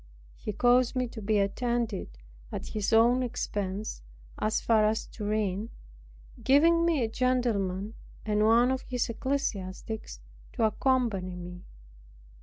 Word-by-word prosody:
He -, -, -5 dB
caused 245 Hz, +4 st, +3 dB
me 250 Hz, -1 st, 0 dB
to 225 Hz, -, -8 dB
be 210 Hz, +1 st, +1 dB
attended, 210 Hz, -, -1 dB, 0.3 s
at -, -, -5 dB
his 210 Hz, 0 st, -2 dB
own 235 Hz, +3 st, +5 dB
expense, 210 Hz, -, -3 dB, 0.4 s
as 215 Hz, +1 st, +1 dB
far 220 Hz, -2 st, +3 dB
as 220 Hz, +1 st, 0 dB
Turin, 210 Hz, -1 st, -2 dB, 0.7 s
giving 330 Hz, +5 st, +5 dB
me 315 Hz, -7 st, +2 dB
a -, -, +1 dB
gentleman 220 Hz, -5 st, 0 dB, 0.3 s
and 210 Hz, 0 st, +1 dB
one 235 Hz, +3 st, +5 dB
of 260 Hz, 0 st, -1 dB
his 250 Hz, -2 st, -2 dB
ecclesiastics 220 Hz, -, -3 dB, 0.3 s
to -, -, -1 dB
accompany 220 Hz, -6 st, +1 dB
me. 180 Hz, 0 st, -9 dB
220 Hz, 125 wpm, -29 LUFS, 200-250 Hz, 0.7 s, own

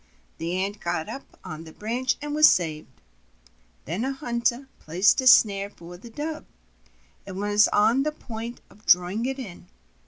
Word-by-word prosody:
The 170 Hz, +2 st, -2 dB
Ant 200 Hz, +2 st, -2 dB
got 170 Hz, -3 st, -2 dB
up 275 Hz, -, -9 dB
on 155 Hz, +1 st, -7 dB
the 160 Hz, -, -12 dB
branch 240 Hz, +7 st, -1 dB
and 295 Hz, 0 st, -4 dB
was 305 Hz, +1 st, +7 dB
saved. 155 Hz, -4 st, -2 dB, 0.9 s
Then 180 Hz, +8 st, -3 dB
a 270 Hz, +1 st, -1 dB
hunter 240 Hz, -1 st, -1 dB
placed 185 Hz, -, +3 dB
a 260 Hz, -, 0 dB
snare 200 Hz, -4 st, +6 dB
for 175 Hz, -3 st, -12 dB
the 210 Hz, +7 st, -12 dB
Dove, 300 Hz, +6 st, -5 dB, 0.8 s
and 190 Hz, -1 st, -7 dB
was 205 Hz, +1 st, +3 dB
on 220 Hz, +5 st, +3 dB
the 305 Hz, +2 st, 0 dB
point 235 Hz, -4 st, -8 dB
of 210 Hz, -, -21 dB
drawing 180 Hz, +7 st, +3 dB
it 270 Hz, 0 st, -3 dB
in. 190 Hz, -9 st, -9 dB
210 Hz, 165 wpm, -25 LUFS, 180-255 Hz, 0.9 s, was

